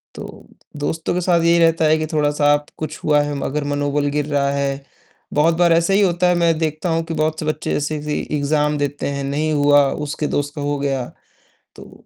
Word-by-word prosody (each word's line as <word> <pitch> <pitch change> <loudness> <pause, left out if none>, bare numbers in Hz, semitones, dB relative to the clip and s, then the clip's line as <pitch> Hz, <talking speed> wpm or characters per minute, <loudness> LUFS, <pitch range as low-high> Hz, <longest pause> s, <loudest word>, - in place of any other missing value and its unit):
तो - - -10 0.3
दोस्तों 160 +3 -2
के 180 - -1
साथ 175 -1 +2
यही 170 +1 +4
रहता 165 -1 +3
है 155 +1 +4
कि 155 - -2
थोड़ा-सा 145 -2 +2 0.2
कुछ 155 0 -5
हुआ 150 -1 +3
है 145 0 -3
मगर 145 +1 -3
मनोबल 145 0 -1
गिर 145 0 -1
रहा 140 -2 0
है, 140 0 -2 0.5
बहुत 160 +3 +3
बार 170 -1 +4
ऐसे 170 +3 +2
ही 200 - +4
होता 180 -2 +2
है, 180 - +3
मैं 170 -2 +2
देखता 155 +2 -2
हूँ 165 0 0
कि 165 0 -5
बहुत 155 0 -1
से 155 - -4
बच्चे 155 0 -2
जैसे 150 0 -3
इग्ज़ाम 150 0 0
देते 145 0 -2
हैं, 140 0 -3
नहीं 150 +3 -1
हुआ 145 -1 +4 0.2
उसके 150 +1 -3
दोस्त 145 0 -2
का 145 - -5
हो 145 0 -1
गया, 135 -3 -1 0.7
तो - - -15
150 Hz, 210 wpm, -19 LUFS, 145-165 Hz, 0.7 s, यही